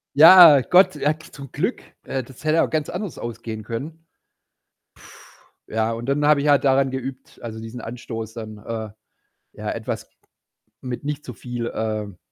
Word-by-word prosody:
Ja, 160 -2 +9
Gott, 180 +8 +5
ja 150 0 +1
k 155 - -16
zum 140 -2 -10
Glück, - - -2 0.2
äh, 135 -1 -3
das 130 +3 -14
hätte 155 +1 +3
auch - - 0
ganz 155 -2 -1
anders 185 -1 -5
ausgehen 115 -2 -6
können. 145 +9 -7 1.6
Ja, 110 +1 -1
und 115 +2 -6
dann 145 +2 +1
habe 150 -1 +4
ich 145 - -1
halt 145 -1 +4
daran 135 0 +3
geübt, 130 0 -7
also 110 -1 -7
diesen 115 +2 -8
Anstoß 115 -2 -7
dann, 110 -2 -8
äh, 110 +1 -6 0.6
ja, - - -5
etwas, - - -5 0.7
mit 125 0 -5
nicht 150 +1 -4
zu 125 - -7
viel, 120 +1 -5
ähm 110 -3 -3
130 Hz, 165 wpm, -22 LUFS, 115-150 Hz, 1.6 s, Ja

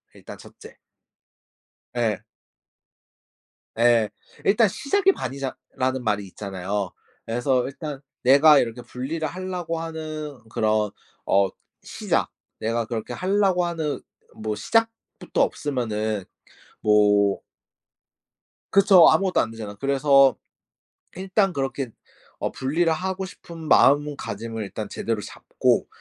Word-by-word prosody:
일단 - - -11
1 - - -16
째. - - -14 1.1
예. 110 -4 -1 1.6
예. 115 -2 +4 0.4
일단 215 +3 +5
"시작이 390 - +2
반이다."라는 130 - -4
말이 105 -3 0
있잖아요. 95 0 -4 0.3
그래서 120 +2 +1
일단 140 0 -6 0.2
내가 140 +3 +7
이렇게 120 0 -2
분리를 145 +7 -4
하려고 180 -1 -4
하는 155 -3 -6
그런 110 -1 +1 0.3
어 100 0 +3 0.4
시작 - - -1 0.3
내가 115 +1 -1
그렇게 110 -1 -4
하려고 190 -2 +2
하는 160 -4 -2 0.4
뭐 110 -1 -3
시작부터 225 - -1
없으면은 110 -7 -1 0.6
뭐 105 -1 +4 1.3
그쵸. 195 -3 +7
아무것도 185 +4 +2
안 115 - -3
되잖아. 110 -3 -7
그래서 135 +1 +4 0.8
일단 190 +1 +1
그렇게 135 -3 -3 0.5
어 - - -2
분리를 160 +6 0
하고 190 +3 -2
싶은 170 -2 -11
마음가짐을 115 -8 +2
일단 105 +2 -6
제대로 115 -2 -2
잡고 - - 0
135 Hz, 235 characters per minute, -24 LUFS, 110-165 Hz, 1.6 s, 내가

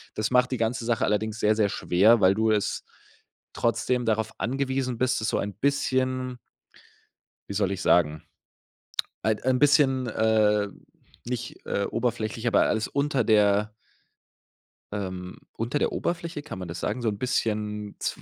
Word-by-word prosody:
Das 110 +3 -1
macht 125 0 +3
die 130 - 0
ganze 115 +1 -1
Sache 115 -1 +1
allerdings 110 +1 -1
sehr, 105 0 +3
sehr 105 -2 +3
schwer, 105 +7 +4
weil 95 +1 +6
du 110 0 +2
es 105 -2 0 0.7
trotzdem 120 +1 0
darauf 110 0 0
angewiesen 130 -1 -1
bist, 130 -1 +1
das 110 - -1
so - - 0
ein 100 0 -3
bisschen 130 -1 0 1.1
wie - - -4
soll 100 -1 +1
ich 95 -1 -3
sagen, 80 -4 +3 1.0
ein 110 +1 +1
ein 130 0 +2
bisschen, 135 -3 +4
äh, 105 -2 +2 0.6
nicht, 120 -1 -5
äh, 100 - 0
oberflächlich, 115 0 -2
aber - - +4
alles 110 -1 0
unter 140 -3 0
der 105 0 +3 1.2
ähm, 95 -2 -5 0.2
unter 120 +6 -2
der - - +1
Oberfläche, 170 -3 -3
kann 145 -11 -7
man 90 - -6
das 85 +1 -5
sagen? 115 +4 -2
So 115 - +1
'n 100 - -4
bisschen 105 -4 -2
zw - - -3
110 Hz, 155 wpm, -26 LUFS, 105-125 Hz, 1.2 s, weil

